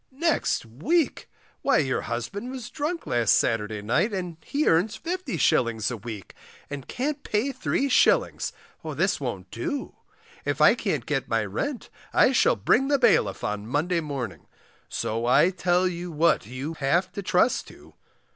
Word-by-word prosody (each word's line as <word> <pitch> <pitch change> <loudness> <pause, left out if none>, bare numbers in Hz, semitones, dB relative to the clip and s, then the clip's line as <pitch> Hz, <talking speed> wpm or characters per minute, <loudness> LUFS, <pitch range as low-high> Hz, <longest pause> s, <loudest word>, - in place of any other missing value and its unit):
Next 305 - 0
week! 255 - 0 0.3
why 275 - +3
your 135 -4 +1
husband 125 - -4
was 255 -2 -7
drunk 315 +2 -3
last 120 -2 +3
Saturday 105 -2 -1
night, 120 - +1
and 180 -4 -4
he 295 +2 -1
earns 180 +6 +2
50s. 145 - 0
a 120 - -4
week, 105 -3 -8 0.4
and 140 -3 -6
can't 285 +3 -2
pay 230 +6 -1
3s, 260 +1 +2 0.4
this - - +1
won't - - -5
do; 295 -5 -4 0.5
If - - -2
I - - +7
can't - - -2
get - - -1
my - - +1
rent 280 -4 -4 0.2
I - - +6
shall - - +4
bring 270 - +2
the 285 0 +3
bailiff 100 - +3
on 105 0 -3
Monday 165 +7 0
morning, 130 - -5 0.4
so 115 +2 -2
I 150 +8 +5
tell 180 0 +2
you 175 0 -4
what 155 -8 +2
you 130 +6 -5
have 170 +7 +1
to 200 - -5
trust 190 +5 +2
to. - - -15
175 Hz, 155 wpm, -26 LUFS, -, 0.5 s, I